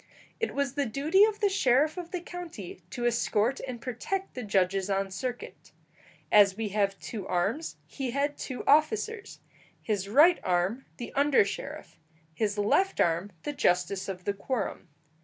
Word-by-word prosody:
It 455 - -2
was 280 -2 0
the 285 -2 0
duty 310 - +4
of 430 0 -3
the 410 - +4
sheriff 300 -5 +3
of 355 -2 -6
the 360 -1 -4
county 330 - -8
to 240 +5 -4
escort 235 +1 +1
and 250 -2 -5
protect 325 +11 -4
the 250 - -5
judges 195 -2 +1
on 195 0 0
circuit. 245 +4 -6 0.6
As 200 -2 +6
we 220 -2 -2
have 200 -1 0
two 205 -5 -6
arms, 200 - -1
he 270 -3 -5
had 280 +3 0
two 260 -3 -6
officers; 395 +8 +1 0.4
his 200 -3 -2
right 310 - +6
arm 185 +8 0
the 240 - -7
under 280 -5 +4
sheriff, 280 +9 -7 0.3
his 210 +4 -1
left 370 - +2
arm 170 +4 +1
the 295 - -3
justice 180 -4 +1
of 180 -1 -6
the 200 - -1
quorum. 220 +2 -3
240 Hz, 160 wpm, -28 LUFS, 200-300 Hz, 0.6 s, As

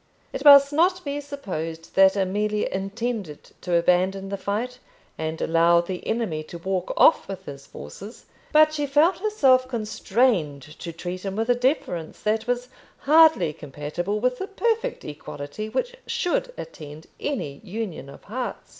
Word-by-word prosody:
It - - -4
must 280 -1 +8
not 360 +3 +2
be 285 0 -3
supposed 165 - -6
that 190 0 +5
Amelia 210 +2 0
intended 195 -4 -4
to 180 -1 -1
abandon 185 +3 +2
the 200 - -2
fight, 215 +6 -3 0.4
and 160 0 -4
allow 170 +1 +4
the 180 +1 -5
enemy 220 -9 -1
to 170 - -9
walk 185 +1 -2
off - - +5
with 190 -1 -7
his 140 -1 -9
forces; 195 - -10 0.3
but 310 0 +5
she 295 -2 -1
felt 300 +6 +3
herself 275 -12 +3
constrained 215 - 0 0.2
to 170 - -6
treat 175 +2 -6
him 195 -1 -4
with 225 +2 -2
a - - +6
deference 245 - -1
that 220 +1 0
was 245 0 -1 0.3
hardly 315 - +5
compatible 150 +8 -4
with 250 +2 0
the 385 - -4
perfect 460 +4 -1
equality 150 +6 -7
which - - -2
should - - -1
attend 150 - -9
any 150 - -4
union 200 -8 -5
of 140 - -13
hearts. 245 +4 -5
210 Hz, 155 wpm, -24 LUFS, 170-265 Hz, 0.4 s, must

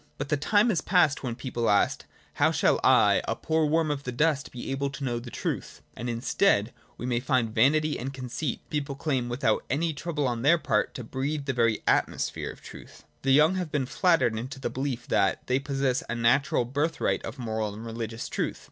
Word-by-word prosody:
But - - -4
the 150 - +3
time 205 +10 +3
is 170 -6 0
past 175 -7 +3
when 120 -3 -3
people 120 -2 -2
asked: 100 -1 +2 0.3
How - - +6
shall - - +2
I, - - +5
a - - 0
poor 160 -1 0
worm 160 0 +2
of 145 -1 -3
the 125 - -5
dust, 140 0 0
be 125 +1 -6
able 140 +1 -1
to 140 0 -8
know 120 -3 -1
the 120 +1 -9
truth - - -4
} - - -35
And 120 - -4
in 115 - -2
its 120 - -7
stead 120 - +2 0.2
we 120 -1 -1
find 125 -4 0
vanity 150 +7 +3
and 130 +3 -4
conceit: 130 +1 -4
people 145 -2 -2
claim, 135 -4 -1
without 120 -2 0
any 160 +4 0
trouble 150 -1 -2
on 120 -2 -2
their 155 +7 +5
part, 105 -9 0
to 125 - -5
breathe 140 +5 -3
the 135 - -1
very 115 -3 +1
atmosphere - - 0
of - - -11
truth. - - -12 0.2
The 135 - -1
young 155 +7 +5
have 180 -5 -3
been 140 -3 0
flattered 130 - +2
into 130 +4 -6
the - - -3
beUef 130 -3 -3
that 95 - +1
they 130 +1 +1
possess 135 -2 0
a 120 - -1
natural 120 +2 +2
birthright 145 +6 -1
of - - -6
moral 110 -3 -2
and 110 +2 -8
religious 115 0 -5
truth. - - -3
135 Hz, 215 wpm, -27 LUFS, 120-150 Hz, 0.3 s, How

